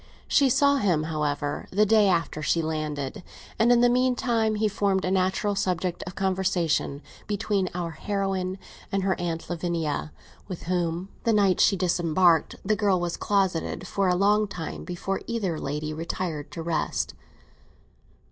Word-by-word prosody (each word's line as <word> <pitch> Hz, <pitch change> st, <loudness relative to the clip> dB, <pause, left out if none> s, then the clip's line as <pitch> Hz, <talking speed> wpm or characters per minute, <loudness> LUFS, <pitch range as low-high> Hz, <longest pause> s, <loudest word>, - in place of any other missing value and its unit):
She 275 Hz, -2 st, +4 dB
saw 280 Hz, +3 st, +4 dB
him, 175 Hz, -, +1 dB
however, 145 Hz, -2 st, -2 dB
the 210 Hz, +3 st, +3 dB
day 215 Hz, -1 st, +5 dB
after 165 Hz, -4 st, 0 dB
she 165 Hz, +2 st, +1 dB
landed; 155 Hz, 0 st, -3 dB, 0.4 s
and, 230 Hz, +2 st, +5 dB
in 240 Hz, -1 st, +5 dB
the 245 Hz, -, +6 dB
meantime, 240 Hz, -3 st, +1 dB
he 215 Hz, +1 st, +1 dB
formed 195 Hz, -2 st, 0 dB
a 185 Hz, -, 0 dB
natural 190 Hz, +2 st, +1 dB
subject 185 Hz, -2 st, -1 dB
of 180 Hz, -, -7 dB
conversation 185 Hz, -6 st, 0 dB, 0.2 s
between 205 Hz, -2 st, 0 dB
our 175 Hz, -2 st, -3 dB
heroine 195 Hz, -1 st, -2 dB, 0.3 s
and 195 Hz, -1 st, 0 dB
her 190 Hz, 0 st, +2 dB
Aunt 165 Hz, -2 st, -3 dB
Lavinia, 165 Hz, -3 st, -2 dB, 0.4 s
with 185 Hz, -4 st, -6 dB
whom, 175 Hz, +1 st, -1 dB
the 230 Hz, -, +2 dB
night 200 Hz, -3 st, +3 dB
she 195 Hz, -, +4 dB
disembarked, 175 Hz, -2 st, +2 dB
the 215 Hz, +2 st, +2 dB
girl 200 Hz, -3 st, +2 dB
was 175 Hz, -1 st, -2 dB
closeted 190 Hz, -3 st, 0 dB
for 195 Hz, +1 st, 0 dB
a 180 Hz, -, +3 dB
long 210 Hz, +3 st, +3 dB
time 180 Hz, -5 st, -6 dB
before 185 Hz, +2 st, -3 dB
either 200 Hz, -9 st, -2 dB
lady 150 Hz, +2 st, -3 dB
retired 160 Hz, -1 st, -4 dB
to 165 Hz, -, -6 dB
rest. 165 Hz, -1 st, -1 dB
185 Hz, 155 wpm, -26 LUFS, 165-205 Hz, 0.4 s, the